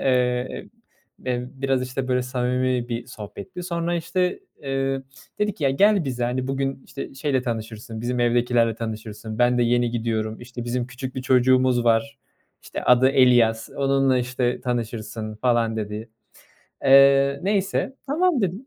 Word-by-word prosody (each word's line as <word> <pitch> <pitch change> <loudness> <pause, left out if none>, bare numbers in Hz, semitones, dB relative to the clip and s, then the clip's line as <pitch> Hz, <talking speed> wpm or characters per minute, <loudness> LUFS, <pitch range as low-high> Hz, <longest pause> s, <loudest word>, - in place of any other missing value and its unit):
Eee, 125 -1 0 0.6
emm. 125 0 -2
B 135 - -18
biraz 135 -1 +1
işte 130 +1 -4
böyle 125 0 +1
samimi 125 0 -1
bir 115 0 -3
sohbetti. 105 - -8
Sonra 170 -1 -2
işte, 180 +2 -1 0.2
eee, 135 -1 -1 0.4
dedi 210 -1 +1
ki, 160 - -7
"Ya, 135 - +4
gel 200 +6 +4
bize, 125 -2 -2
hani, 125 +2 -1
bugün 135 0 -2
işte 140 - -7
şeyle 135 -1 0
tanışırsın, 110 -1 -5
bizim 125 +1 -2
evdekilerle 120 -1 +2
tanışırsın. 110 -1 -6
Ben 125 0 +4
de 120 - +3
yeni 120 0 +2
gidiyorum, 110 -1 -2
işte 120 0 -7
bizim 120 +1 -2
küçük 130 +1 -7
bir 130 - -3
çocuğumuz 130 -1 +3
var. 120 +4 +1 0.4
İşte - - -6
adı 125 +2 +5
Elias, 120 -4 +4
onunla 135 -1 +2
işte 125 0 -1
tanışırsın," 110 -3 -4
falan 115 -1 +1
dedi. 105 +1 -5 0.8
Eee, 140 0 +6
neyse, 200 +7 0
"Tamam," 320 -1 +2
dedim. 195 +7 -2
125 Hz, 150 wpm, -23 LUFS, 120-135 Hz, 0.8 s, Eee